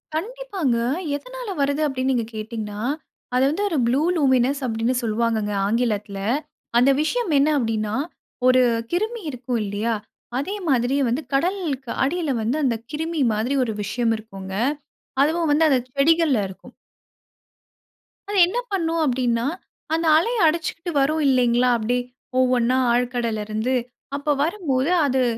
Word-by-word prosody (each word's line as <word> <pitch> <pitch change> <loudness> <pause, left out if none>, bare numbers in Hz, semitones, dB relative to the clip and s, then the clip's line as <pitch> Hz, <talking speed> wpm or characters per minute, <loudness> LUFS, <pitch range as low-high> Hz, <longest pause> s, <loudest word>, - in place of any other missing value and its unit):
கண்டிப்பாங்க. 390 - -2 0.4
எதனால - - -7
வருது 285 +2 +1
அப்பிடின்னு 265 -2 0
நீங்க 235 -3 0
கேட்டீங்கனா, 215 -1 -5 0.6
அத 250 - +3
வந்து 365 +7 -1
1 325 - -1
ப்ளூ 260 +4 +2 0.2
லூமினஸ் 270 -1 +2
அப்பிடின்னு 230 +1 0
சொல்லுவாங்கங்க 220 -2 0
ஆங்கிலத்துல, 210 -3 -1 0.6
அந்த 250 +3 +5
விஷயம் 415 +3 0
என்ன 285 +3 +4
அப்பிடின்னா, 220 -4 -1 0.5
1 255 0 +6 0.3
கிருமி 435 +6 -1
இருக்கும் 245 -1 -3
இல்லயா! 210 +3 -1 0.4
அதே 380 +10 -3
மாதிரி 250 0 +2
வந்து, 245 +6 0
கடலுக்கு 290 -5 -1
அடியில 310 +1 0
வந்து, 235 +7 0
அந்த 240 -3 +2 0.2
கிருமி 320 +1 -2
மாதிரி 230 +6 0
1 220 - -3
விஷயம் 225 +3 0
இருக்குங்க. 195 -3 -9 0.7
அதுவும் 325 +1 +1
வந்து 300 +2 +4
அந்த 265 -3 +4 0.2
செடிகள்ல 310 -1 +4
இருக்கும். 190 - -13 1.6
அது 410 - -1
என்ன 395 +7 -3
பண்ணும் 330 -4 0
அப்டின்னா, 245 -3 +1 0.5
அந்த 330 +1 +1
அலை 460 +9 +1
அடிச்சுக்கிட்டு 335 +2 -2
வரும் 305 +3 +1
இல்லைங்களா, 250 -1 +3
அப்டியே 245 +3 0 0.4
ஒவ்வொன்னா 255 -1 +3
ஆழ்கடல்லருந்து. 235 -1 -1 0.4
அப்ப 290 0 0
வரும்போது 315 -5 0
அது, 260 -1 +2
260 Hz, 130 wpm, -23 LUFS, 230-320 Hz, 1.6 s, 1